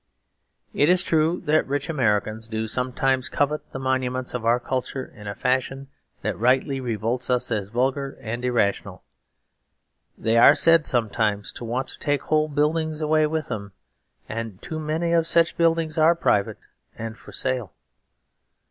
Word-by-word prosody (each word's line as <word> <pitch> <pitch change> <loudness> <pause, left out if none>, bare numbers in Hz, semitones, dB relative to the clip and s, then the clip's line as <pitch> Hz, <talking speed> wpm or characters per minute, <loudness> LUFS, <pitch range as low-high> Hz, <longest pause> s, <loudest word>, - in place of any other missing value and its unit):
It 145 - +3
is 180 0 +4
true 160 +2 +1
that 155 +1 +2
rich 140 +1 -2
Americans 110 -6 0
do 110 0 -3
sometimes 130 +2 0
covet 150 +1 -1
the - - -6
monuments 130 -1 -2
of 125 -2 -3
our 120 +1 +4
culture 130 +1 -3
in 105 -3 -13
a 100 - -4
fashion 130 +3 -1 0.3
that - - -2
rightly 130 +3 +2
revolts 120 +1 -2
us 125 -1 0
as 105 -3 -2
vulgar 135 +4 -1
and 120 +2 -5
irrational. 100 -6 -1 1.1
They 115 +1 +2
are - - +8
said 165 -2 +5
sometimes 110 -4 0
to 120 - -8
want 125 +3 -2
to - - -7
take 145 -2 +1
whole 155 0 +1
buildings 155 +1 0
away 155 0 +2
with 155 -1 -3
them; 100 -2 -5 0.5
and 110 -3 -5
too 160 - -5
many 160 +2 -1
of 165 -1 +2
such 165 0 +3
buildings 165 -2 +1
are 160 +2 +5
private 105 -11 +1 0.4
and 115 0 -5
for - - -14
sale. 130 -7 -2
130 Hz, 155 wpm, -24 LUFS, 115-155 Hz, 1.1 s, are